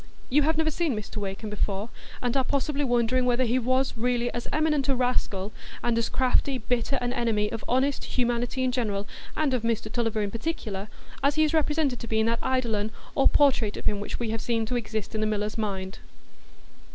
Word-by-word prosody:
You 295 +3 +5
have 315 +2 +2
never 315 0 +2
seen 310 -4 0
Mr 210 0 -6
Wakem 205 +1 -4
before, 205 +1 -2 0.3
and 245 0 0
are 265 - +3
possibly 285 +2 0
wondering 245 0 +2
whether 250 0 +2
he 250 +1 +2
was 255 +2 +1
really 240 +1 0
as 240 - -4
eminent 300 -3 +2
a 270 - +4
rascal, 220 -5 0 0.3
and 240 -1 +2
as 230 0 +1
crafty, 260 +1 +2
bitter 245 +3 0
an 245 0 -1
enemy 225 -4 +1
of 225 - -4
honest 265 +3 +1
humanity 245 +1 0
in 255 - +2
general, 210 -5 -1 0.3
and 300 -4 +2
of 250 - +1
Mr 230 -1 -1
Tulliver 225 -2 0
in 200 - -2
particular, 220 -6 -3 0.3
as 280 +1 +3
he 310 - +4
is 305 - +1
represented 300 -4 +1
to 235 - -6
be 220 0 +1
in 220 - +3
that 230 0 +1
eidolon 230 -5 +1 0.2
or 275 - +5
portrait 245 -7 +3
of - - -8
him 205 - +1
which 205 - -4
we 230 -2 -1
have 225 - -2
seen 230 -2 0
to 245 - -2
exist 220 -3 -3
in 215 - -1
the 215 - +2
miller's 210 0 -1
mind. 195 -3 -3
240 Hz, 210 wpm, -27 LUFS, 215-260 Hz, 0.3 s, You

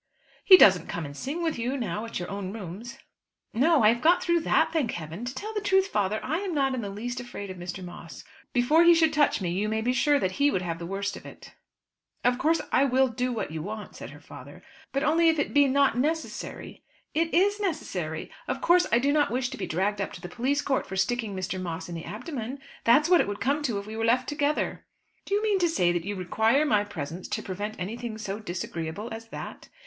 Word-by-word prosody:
"He 375 - +10
doesn't 185 - +6
come 170 - -4
and 145 0 -8
sing 295 - -4
with 320 -7 -1
you 250 +4 -1
now 215 -3 -3
at 230 - -5
your 175 - -4
own 200 -1 -5
rooms." 210 +3 -8 0.6
"No; 290 +2 +4
I 215 - +7
have 235 +1 +1
got 350 +4 +4
through 340 -1 +2
that, - - +2
thank 290 -8 0
Heaven! 170 +7 -6
To 250 +2 -5
tell 430 +9 -5
the 420 - -2
truth, 385 -1 +2
father, 205 +1 0
I 315 +6 -1
am 380 -4 -3
not 270 -2 +2
in 255 - -2
the 205 - -4
least 240 +5 -5
afraid 205 -5 -7
of 185 - -9
Mr. 175 +1 -6
Moss. 175 - -10 0.3
Before 280 +7 +4
he 340 0 +7
should 320 -2 +3
touch 295 -8 +2
me 175 -2 -1
you 200 +4 -1
may 220 0 0
be 245 +3 +1
sure 290 +2 +3
that 185 -9 0
he 290 - +6
would 185 -10 -1
have 165 -2 -3
the 170 - -6
worst 200 +2 -3
of - - -10
it." - - -12 0.7
"Of 245 0 +2
course 320 +2 +2
I - - +4
will 265 -1 +3
do 250 +1 -2
what 230 -9 -3
you 160 -1 -4
want," 210 +4 -7
said - - -8
her - - -12
father; - - -12 0.3
"but 275 +1 -1
only 325 +2 +4
if 320 - +2
it 290 - -1
be 285 0 +5
not 275 -2 +3
necessary 315 +6 -3 0.2
" - - -39
"It 330 +1 +1
is 405 +4 +3
necessary. 185 - -3 0.2
Of - - -2
course, 350 +1 +4
I 235 - +5
do 280 +4 +2
not 295 -1 +3
wish 250 +1 -1
to - - -6
be - - -4
dragged 195 +5 0
up 195 - -3
to 180 - -10
the 180 - -6
police 270 +10 -1
court 270 -2 0
for 190 - -6
sticking 220 +1 -1
Mr. 185 0 -3
Moss 170 -1 -5
in - - -6
the 165 -1 -6
abdomen. 245 - -5 0.3
That's 280 +7 +5
what 355 0 +6
it - - -1
would 205 0 -4
come 285 +3 0
to 240 -8 -1
if 200 - -5
we 215 +1 -7
were 225 0 -1
left 250 +3 +2
together." 295 0 -1 0.4
"Do 400 - 0
you 415 - 0
mean 415 -3 +2
to 350 -2 +2
say 180 - +2
that 175 -1 -2
you 205 +1 -3
require 220 - +2
my 210 -8 +3
presence 175 -3 -6
to - - -3
prevent 205 +3 -4
anything 220 +4 -5
so 210 -1 -5
disagreeable 175 +1 -5
as 225 0 -8
that?" - - -8
235 Hz, 245 wpm, -27 LUFS, 195-295 Hz, 0.7 s, He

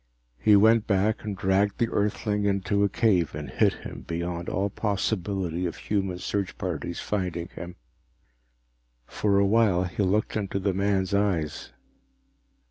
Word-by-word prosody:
He 105 - +5
went 110 +2 +5
back 105 +2 +1
and 105 -2 -4
dragged 95 +2 +1
the 115 - +1
Earthling 105 0 0
into 100 0 +1
a 100 - +3
cave 95 -8 +2
and 75 -1 -6
hid - - +3
him - - -7
beyond 85 +1 -3
all 100 +2 -1
possibility 95 -4 -1
of 85 - -5
human 95 -3 -2
search 95 0 -3
parties 85 -1 -4
finding 90 -4 -3
him. 85 0 -8 1.3
For 100 - 0
a 100 - +4
while 100 -4 +3
he 95 +3 -3
looked 100 +2 +1
into 100 -2 -2
the 100 0 0
man's 100 0 0
eyes. 95 -7 0
100 Hz, 145 wpm, -26 LUFS, 90-105 Hz, 1.3 s, He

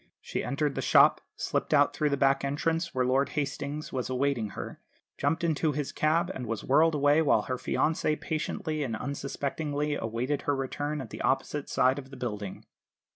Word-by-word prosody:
She - - -4
entered 145 0 0
the - - -2
shop, - - +5
slipped - - 0
out - - +4
through 150 - +1
the 140 - 0
back 135 0 +3
entrance 165 +4 0
where 130 -1 +2
Lord 135 +2 +2
Hastings 145 +1 -3
was 130 -1 -2
awaiting 130 -4 0
her, - - -6 0.4
jumped 155 +5 0
into 160 -2 +1
his 145 -1 -2
cab, 165 +4 +1
and 125 -2 -5
was 115 -1 -3
whirled 155 +4 +4
away 145 +2 +4
while 155 - +3
her 130 - -3
fiancé 155 +3 0
patiently 155 0 -2
and 120 -6 -2
unsuspectingly 145 +3 -2
awaited 125 +3 -2
her 145 - +3
return 145 +2 -3
at 125 - -9
the - - -6
opposite 135 +2 0
side 130 +2 +3
of 135 -1 -10
the 135 - -10
building. 105 -5 -5
140 Hz, 180 wpm, -29 LUFS, 130-150 Hz, 0.4 s, shop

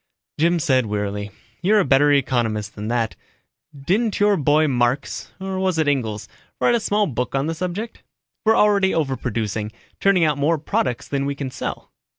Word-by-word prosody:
Jim 170 +2 +3
said 130 -7 +2
wearily, 105 0 -3 0.3
"You're 210 +4 +4
a 195 - +2
better 145 +2 +4
economist 120 -7 0
than 105 0 -6
that. 115 -1 -1 0.6
Didn't 205 +9 0
your 205 0 +4
boy 155 0 +3
Marx, 125 +1 -1
or 190 0 -4
was 190 -3 0
it 160 -2 +1
Engels, 110 -9 -1 0.3
write 240 - +3
a 235 - +3
small 210 -1 +1
book 125 - -3
on 135 +1 +1
the 165 - -1
subject? 185 +7 -5 0.4
We're 220 0 +4
already 200 -2 +3
overproducing 115 -8 -2 0.3
turning 195 -3 +3
out 150 -2 +1
more 160 +4 +2
products 130 -4 -2
than 140 -1 -1
we 140 - -2
can 140 -2 -5
sell." - - -6
145 Hz, 170 wpm, -22 LUFS, 120-185 Hz, 0.6 s, You're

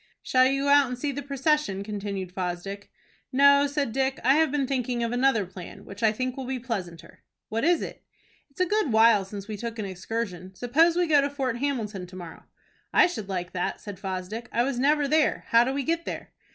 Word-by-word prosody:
"Shall 255 0 +4
you 275 +1 0
go 285 - +1
out 285 -1 +6
and 250 0 -5
see 285 +3 -2
the 280 +1 -5
procession?" 280 -7 0
continued 200 -3 -5
Fosdick. 185 +2 -4 0.4
"No," 280 +1 +6
said 285 -4 -1
Dick; 265 +2 0
"I 260 +3 +5
have 315 +1 +3
been 280 -1 0
thinking 250 -2 -1
of 230 - -1
another 245 -4 +2
plan, 180 -1 -11
which 200 +3 -10
I 220 -2 +4
think 255 +3 -3
will 265 -2 -6
be 265 0 -2
pleasanter." 195 -9 -6 0.3
"What 225 +1 -2
is 340 +2 +3
it?" - - -8 0.5
"It's 275 - -21
a 365 - +4
good 415 - +1
while 220 -2 +5
since 200 0 -8
we 215 -1 -5
took 230 +2 -5
an 215 - -3
excursion. 190 -1 -5
Suppose 315 - +3
we 355 - +3
go 300 -3 +4
to 280 - 0
Fort 265 -4 -2
Hamilton 220 -9 -2
to 185 - -13
morrow." 175 -3 -10 0.5
"I - - +6
should 220 - -4
like 180 -2 -3
that," 180 - -2
said 200 -3 -9
Fosdick. 195 +4 -5
"I 235 - +2
was 255 -1 -2
never 290 +2 +3
there. 310 +2 +2
How 230 +1 +6
do 255 - -1
we 275 0 -2
get 335 +3 -1
there?" - - -6
245 Hz, 220 wpm, -26 LUFS, 200-280 Hz, 0.5 s, out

